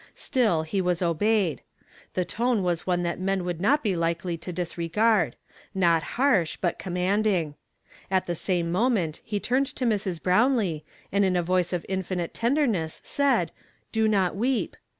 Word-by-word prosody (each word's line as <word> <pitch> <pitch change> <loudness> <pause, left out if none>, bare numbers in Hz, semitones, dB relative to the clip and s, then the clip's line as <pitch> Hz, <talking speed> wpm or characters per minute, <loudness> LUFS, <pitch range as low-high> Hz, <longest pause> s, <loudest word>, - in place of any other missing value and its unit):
Still, 215 -11 +1
he 190 +5 -1
was 180 0 0
obeyed. 175 - +1 0.5
The 180 - +1
tone 235 -1 0
was 175 -1 -1
one 175 -1 +1
that 170 0 -2
men 190 -1 -1
would 175 -2 -3
not 290 +9 +3
be 200 -5 +1
likely 170 +1 -1
to 165 +2 -7
dis 175 -1 -4
regard—not 175 - +1 0.2
harsh, 240 - +2
but 175 -3 -1
commanding. 185 -2 0 0.6
At 190 -1 +1
the 175 - -2
same 170 0 -1
moment 185 -6 +1
he 210 -2 -2
turned 260 +6 +1
to 255 - -2
Mi 230 - +3
s. 195 -4 -2
Brownlee, 185 - +2 0.3
and 200 +1 +2
in 185 -2 +2
a 175 - +1
voice 180 0 +1
of 180 -2 -2
infinite 185 -2 -3
tenderness 230 - 0
said, 280 -1 +1 0.2
' - - -40
Do 220 -1 +2
not 195 -4 +2
weep.' 245 +5 0
185 Hz, 170 wpm, -26 LUFS, 170-215 Hz, 0.6 s, not